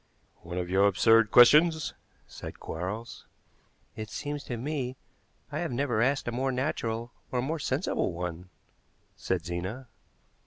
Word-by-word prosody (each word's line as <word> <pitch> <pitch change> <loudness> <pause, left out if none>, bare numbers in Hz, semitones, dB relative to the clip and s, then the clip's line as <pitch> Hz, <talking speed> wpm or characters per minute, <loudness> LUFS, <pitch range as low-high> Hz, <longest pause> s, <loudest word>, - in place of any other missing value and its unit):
"One 85 +1 -6
of 90 -1 -2
your 95 +3 +4
absurd 115 +3 +5
questions," 150 +7 +6 0.3
said - - -9
Quarles. 100 +8 -6 0.7
"It 110 0 -6
seems 145 +3 -4
to 120 - -4
me 130 0 -3 0.6
I - - -2
have - - -2
never 120 -3 0
asked 135 +2 +1
a - - 0
more 130 +3 0
natural 120 -3 -2 0.2
or 125 - -1
a - - +2
more 155 +4 -2
sensible 140 - 0
one," 90 +1 -5 0.7
said 90 -3 -2
Zena. 95 +9 -5
120 Hz, 145 wpm, -29 LUFS, 95-135 Hz, 0.7 s, questions